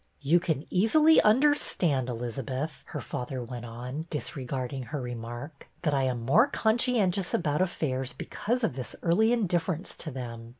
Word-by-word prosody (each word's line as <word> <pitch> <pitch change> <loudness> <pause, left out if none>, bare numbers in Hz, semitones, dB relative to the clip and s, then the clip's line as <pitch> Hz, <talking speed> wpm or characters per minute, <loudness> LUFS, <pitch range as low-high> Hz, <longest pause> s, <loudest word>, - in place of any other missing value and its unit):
You 155 +5 +4
can 160 -4 -2
easily 300 - +5
understand, 210 - +3
Elizabeth," 130 +5 -4
her - - -5
father 125 0 -4
went 120 0 -7
on, 125 +7 -6
disregarding 135 -3 -4
her 145 +4 -4
remark, 120 +4 -7 0.2
that 150 -3 +1
I 135 -1 +2
am 125 -2 -1
more 220 - +5
conscientious 220 -7 +2
about 150 -1 0
affairs 135 -8 -1
because 240 +3 -3
of 225 - +1
this 130 -2 -5
early 200 +7 +3
indifference 180 -6 0
to 155 - -5
them. 120 -4 -7
145 Hz, 145 wpm, -28 LUFS, 125-185 Hz, 0.2 s, easily